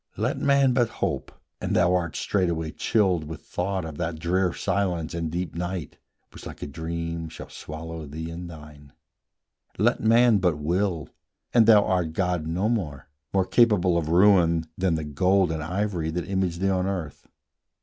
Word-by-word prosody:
Let - - -1
man 140 -2 +3
but 120 -2 +2
hope, 65 0 -2 0.3
and - - -1
thou 90 +1 +4
art 85 -4 -1
straightway 85 -5 -1
chilled 95 -7 +1
With 80 +2 -8
thought 95 0 -2
of 80 -1 -8
that 80 -1 -2
drear 90 +3 +1
silence 90 -6 -1
and 85 -1 -2
deep 85 +2 -3
night 85 -2 -5 0.3
Which, - - -10
like - - -9
a - - -2
dream, 85 +2 -4
shall 80 - -10
swallow 80 0 -7
thee 80 +3 -6
and 85 +1 -7
thine: 75 -3 -13 0.8
Let - - +2
man 115 0 +5
but 90 -5 +1
will, 85 +1 -1 0.4
and 115 -2 +5
thou 105 -3 +7
art 90 -4 0
god 90 -3 -1
no 90 +6 0
more, 80 - -3 0.2
More 95 -1 +2
capable 100 -6 +3
of 80 -2 0
ruin 85 -3 +4
than 90 -3 +1
the 80 - -2
gold 90 +5 +2
And 80 -1 -3
ivory 90 0 -2
that 85 +2 -3
image 95 -3 -1
thee 95 +2 0
on 95 0 0
earth. 90 -7 -5
85 Hz, 170 wpm, -25 LUFS, 80-95 Hz, 0.8 s, thou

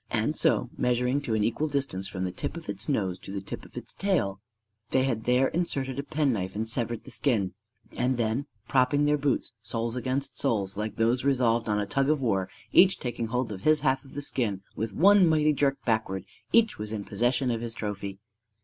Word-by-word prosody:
And - - 0
so, - - +2
measuring 125 +3 +1
to 115 -6 -1
an 105 - +1
equal 120 +8 0
distance 135 -10 -2
from 95 -1 -4
the 90 - -1
tip 170 - -5
of 165 - -9
its 100 +4 -3
nose 95 -9 0
and 100 - -6
the - - -1
tip 95 - -7
of - - -14
its - - -6
tail, 120 - 0 0.5
they 130 - +3
had 115 -5 -1
there 125 +2 +3
inserted 135 -6 -1
a - - +1
penknife 130 -11 -1
and 110 +2 -2
severed 120 -1 -2
the - - -9
skin; 105 -10 0 0.4
and 125 +1 0
then, 120 +5 0 0.2
propping 135 +2 +3
their 150 0 +2
boots, 140 -4 0
soles 115 +2 -2
against 130 +2 -2
soles, 100 -8 0
like 105 0 -3
those 120 +3 +2
resolved 120 -4 +2
on 105 0 +2
a 105 - 0
tug 135 +7 +1
of 155 -1 +3
war, 100 -8 0 0.2
and - - +5
each 190 0 +3
taking 120 -2 -3
hold 125 0 -1
of 95 -2 -6
his 155 +5 +4
half 135 -1 +1
of 135 - -15
the 145 - -2
skin, 105 -9 -1
with 110 0 -2
one 195 - +6
mighty 155 -1 +3
jerk 140 -1 +1
backwards 110 -5 0 0.3
each 230 - +4
was 105 0 -4
in 105 -2 -3
possession 120 +1 +1
of 115 -1 -2
his 115 -1 -4
trophy! 100 -2 -4
120 Hz, 215 wpm, -28 LUFS, 105-140 Hz, 0.5 s, one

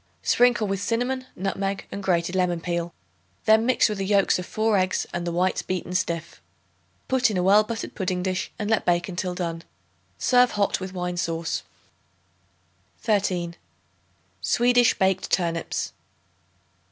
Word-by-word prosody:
Sprinkle 245 -3 +3
with 195 -1 -2
cinnamon, 250 +4 -1
nutmeg 195 +1 -2
and 200 - -5
grated 180 -2 0
lemon 180 -2 +1
peel; 170 0 -2 0.5
then 220 +1 +5
mix 255 - +4
with 210 -3 -4
the - - -1
yolks 200 -2 +3
of 180 - -6
4 220 0 +1
eggs 185 0 0
and 175 0 -3
the - - -1
whites 180 +2 +1
beaten 180 -1 -4
stiff. 170 -2 -2 0.7
Put 260 -2 +3
in 205 - -2
a 180 - +1
well 200 +3 +6
buttered 225 +1 -5
pudding 185 -2 -2
dish, 185 0 -2
and 210 - -3
let 225 0 +2
bake 175 0 +1
until 180 0 -3
done. 165 -2 -4 0.5
Serve 250 -1 +4
hot 205 -1 +1
with 190 0 -6
wine 180 -1 -3
sauce. 165 -1 -2 1.4
13. 185 -5 0 0.9
Swedish 245 0 +3
Baked 190 0 +1
Turnips. 170 -2 -1
190 Hz, 150 wpm, -25 LUFS, 175-215 Hz, 1.4 s, well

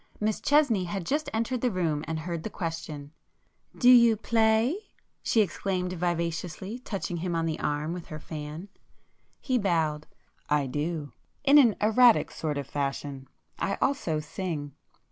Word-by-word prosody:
Miss 215 0 -1
Chesney 285 -10 +3
had 180 0 -4
just 300 - -1
entered 230 +2 -1
the 250 - +2
room 165 -7 -1
and 160 0 -3
heard 170 0 -4
the 220 - -5
question. 160 -6 -5 0.7
"Do 245 - +2
you 235 -2 +7
play?" 225 - +2 0.4
she 225 - +3
exclaimed 185 -2 -1
vivaciously, 175 +4 -3
touching 195 -7 -4
him 175 0 -2
on 165 0 0
the 160 -1 -2
arm 150 +3 -1
with 175 -2 -7
her 155 - -7
fan. 155 +5 -7 0.7
He 255 -2 0
bowed. 160 -6 0 0.4
"I 150 -1 +2
do. 150 +2 -3 0.3
In 285 +1 +7
an 235 -7 +5
erratic 225 +3 +5
sort 150 -2 -3
of 140 - -3
fashion. 140 -1 -4 0.3
I 195 - 0
also 220 - 0
sing. 150 -2 -5
175 Hz, 150 wpm, -28 LUFS, 155-220 Hz, 0.7 s, you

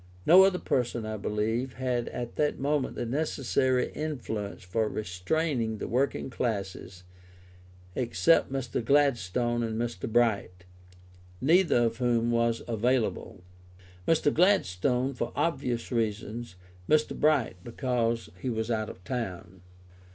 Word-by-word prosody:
No 180 +4 +8
other 195 -2 +2
person, 120 -7 -1
I 110 0 -3
believe, 110 +5 -1
had 125 -2 -2
at 120 -1 -6
that 150 -1 +1
moment 145 0 -1
the - - -3
necessary 130 -1 0
influence 120 -11 -4
for 105 +4 -1
restraining 110 - -1
the - - -5
working 130 +1 -1
classes, 100 -6 -4 0.9
except 120 - +2
Mr. 130 -4 -2
Gladstone 120 -4 +2
and 115 -1 -2
Mr. 115 -3 -3
Bright, 100 -6 +1 0.7
neither 160 -4 +4
of 115 -1 0
whom 120 -1 +1
was 115 0 +1
available: 115 -4 -1 0.6
Mr. 155 -3 +3
Gladstone, 135 - +2
for 120 -2 -3
obvious 125 -9 -1
reasons; 110 -1 -2 0.3
Mr. 155 0 +3
Bright 145 -11 +2
because 120 -2 -1
he 130 - -2
was 110 0 -2
out 110 -2 -1
of 95 - -11
town. 95 -5 -5
120 Hz, 120 wpm, -28 LUFS, 110-135 Hz, 0.9 s, No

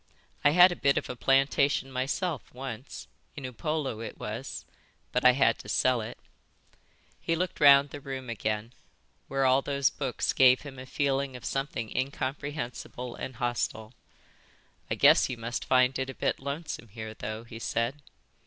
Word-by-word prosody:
I 145 - +7
had 180 +4 +7
a - - -2
bit 140 -3 +2
of - - -2
a - - -6
plantation 135 +1 +2
myself 135 - -2
once, 130 -1 -7 0.3
in 140 - -6
Upolu 130 0 -3
it - - -7
was, - - -6 0.5
but 125 - 0
I 125 0 +8
had 125 -3 +3
to 105 - -10
sell 125 +2 +2
it." 110 +3 -7 1.0
He 165 - 0
looked 180 +1 -2
round 140 -1 +7
the 145 - -8
room 135 -2 -6
again, 110 0 -3 0.5
where 135 0 0
all 130 +1 +4
those 140 -1 +1
books 135 -4 -2
gave 130 -1 +6
him 135 -3 -9
a 130 - -9
feeling 140 -1 0
of 125 - -9
something 135 -5 -3
incomprehensible 130 -2 -4
and 130 - -6
hostile. 120 -2 -2 1.0
"I - - 0
guess - - +6
you 125 - -4
must 115 +1 -4
find 130 0 +3
it 130 0 -2
a 135 - -7
bit - - -1
lonesome 140 -3 -5
here 110 +1 -7
though," 110 0 -6
he 115 -1 -10
said. 120 +5 -2
130 Hz, 165 wpm, -28 LUFS, 120-140 Hz, 1.0 s, I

